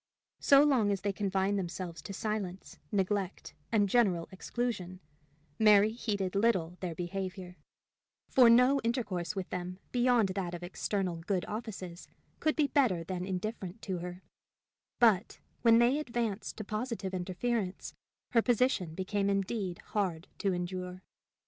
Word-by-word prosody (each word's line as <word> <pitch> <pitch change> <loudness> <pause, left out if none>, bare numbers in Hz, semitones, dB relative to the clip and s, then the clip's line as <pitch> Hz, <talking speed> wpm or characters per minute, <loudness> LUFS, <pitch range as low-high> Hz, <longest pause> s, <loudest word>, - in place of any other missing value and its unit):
So 280 0 +7
long 260 -8 +3
as 195 - -1
they 200 -1 -1
confined 195 0 0
themselves 175 -1 -5
to - - -8
silence, 195 -2 -4
neglect, 195 -1 -1 0.2
and 210 -3 +3
general 190 -6 +2
exclusion, 190 -3 -3 0.6
Mary 210 -1 +6
heeded 205 -5 -2
little 195 -5 +2
their 175 -3 -4
behavior, 185 +1 -5 0.7
for 250 -3 +6
no 250 +4 +6
intercourse 210 -6 -1
with 190 -2 -4
them, 180 0 -4
beyond 245 -4 +3
that 185 -2 -3
of 175 - -8
external 185 0 -2
good 180 +2 -1
offices, 195 -5 -6 0.3
could 310 - +1
be 305 - +3
better 245 - +2
than 180 +1 -4
indifferent 195 +1 -4
to 185 -3 -3
her; 180 +1 -7 0.7
but, 220 -6 +3 0.2
when 230 -1 +6
they 245 +5 +4
advanced 235 -7 -3
to 215 - -4
positive 215 -2 -3
interference, 190 +2 -2 0.4
her 230 - +5
position 230 -9 +1
became 195 +2 -1
indeed 195 -2 -1 0.2
hard 185 -5 -1
to 195 - +1
endure. 180 +1 -4
195 Hz, 135 wpm, -31 LUFS, 180-230 Hz, 0.7 s, So